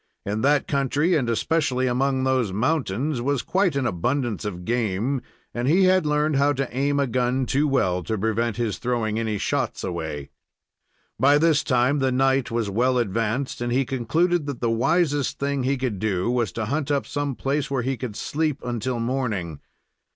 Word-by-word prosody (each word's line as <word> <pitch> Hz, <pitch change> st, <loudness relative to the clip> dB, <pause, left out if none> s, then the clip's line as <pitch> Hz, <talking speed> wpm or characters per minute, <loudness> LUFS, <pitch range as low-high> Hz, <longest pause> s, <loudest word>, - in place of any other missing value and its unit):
In 105 Hz, +2 st, -2 dB
that 145 Hz, +2 st, +2 dB
country, 140 Hz, +5 st, +1 dB
and 130 Hz, -6 st, 0 dB
especially 130 Hz, +1 st, +1 dB
among 130 Hz, +1 st, +1 dB
those 130 Hz, -6 st, +1 dB
mountains, 125 Hz, +3 st, 0 dB
was 140 Hz, 0 st, 0 dB
quite 185 Hz, -2 st, +1 dB
an 140 Hz, -2 st, 0 dB
abundance 120 Hz, +3 st, -1 dB
of 90 Hz, -4 st, -5 dB
game, 120 Hz, +2 st, 0 dB, 0.3 s
and 120 Hz, +1 st, -2 dB
he 175 Hz, +6 st, +4 dB
had 185 Hz, -3 st, +4 dB
learned 150 Hz, 0 st, +1 dB
how 140 Hz, +1 st, +3 dB
to 135 Hz, -1 st, -2 dB
aim 140 Hz, +2 st, +1 dB
a 140 Hz, -, +3 dB
gun 125 Hz, +1 st, 0 dB
too 140 Hz, +4 st, +1 dB
well 95 Hz, -10 st, +1 dB
to 110 Hz, -, -1 dB
prevent 110 Hz, +2 st, -1 dB
his 115 Hz, -4 st, -2 dB
throwing 115 Hz, -3 st, -1 dB
any 110 Hz, -2 st, -1 dB
shots -, -, -2 dB
away. 80 Hz, -5 st, -4 dB, 0.9 s
By 140 Hz, +4 st, +5 dB
this 155 Hz, -1 st, +3 dB
time 130 Hz, +2 st, +2 dB
the 135 Hz, -1 st, +1 dB
night 135 Hz, 0 st, +2 dB
was 115 Hz, -2 st, -1 dB
well 125 Hz, +6 st, +1 dB
advanced, 115 Hz, +4 st, -1 dB
and 120 Hz, 0 st, -1 dB
he 130 Hz, +2 st, +2 dB
concluded 150 Hz, +7 st, 0 dB
that 140 Hz, -4 st, -4 dB
the 115 Hz, -, 0 dB
wisest 145 Hz, +4 st, +1 dB
thing 140 Hz, -1 st, -1 dB
he 135 Hz, +2 st, 0 dB
could 125 Hz, -7 st, -2 dB
do 100 Hz, +1 st, 0 dB
was 120 Hz, -5 st, 0 dB
to 110 Hz, -, -2 dB
hunt 145 Hz, +5 st, -2 dB
up 140 Hz, -1 st, +1 dB
some 145 Hz, -2 st, -3 dB
place 140 Hz, +3 st, -1 dB
where 135 Hz, -3 st, -1 dB
he 135 Hz, +2 st, -1 dB
could 120 Hz, -4 st, -6 dB
sleep 155 Hz, +1 st, -1 dB
until 120 Hz, 0 st, -2 dB
morning. 115 Hz, -, -2 dB
130 Hz, 185 wpm, -24 LUFS, 115-140 Hz, 0.9 s, By